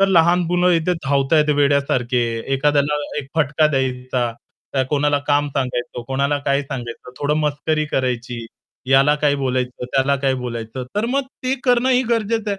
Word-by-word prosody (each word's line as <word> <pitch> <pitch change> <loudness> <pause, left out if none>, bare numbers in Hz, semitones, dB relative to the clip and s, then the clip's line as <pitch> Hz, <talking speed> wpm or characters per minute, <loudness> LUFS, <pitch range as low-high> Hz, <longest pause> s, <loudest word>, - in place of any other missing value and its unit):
तर 195 - +4
लहान 175 -1 +4
मुलं 180 0 +3
इथे 170 +1 +1
धावत 135 0 +1
आहेत 150 -1 +4
वेड्यासारखे, 140 -4 +2 0.3
एखाद्याला 145 +1 +2 0.2
एक 135 - -13
फटका 155 0 +3
द्यायचा, 130 -3 -1 0.6
कोणाला 145 0 +2
काम 145 0 +2
सांगायचं, 125 -3 -3
कोणाला 140 +2 0
काय 140 +1 +2
सांगायचं, 125 -3 -7
थोडं 145 +1 +1
मस्करी 155 +1 0
करायची, 125 -2 -2 0.5
याला 135 +2 +5
काही 145 -1 +3
बोलायचं, 125 -2 -2
त्याला 135 +2 +1
काही 135 -1 0
बोलायचं. 120 +1 -5
तर 210 +2 +1
मग 275 +3 +1 0.2
ते 255 +1 +1
करणं 250 +1 +3
ही 255 0 +4
गरजेचं 225 -1 0
आहे. 200 - -2
140 Hz, 155 wpm, -20 LUFS, 130-155 Hz, 0.6 s, याला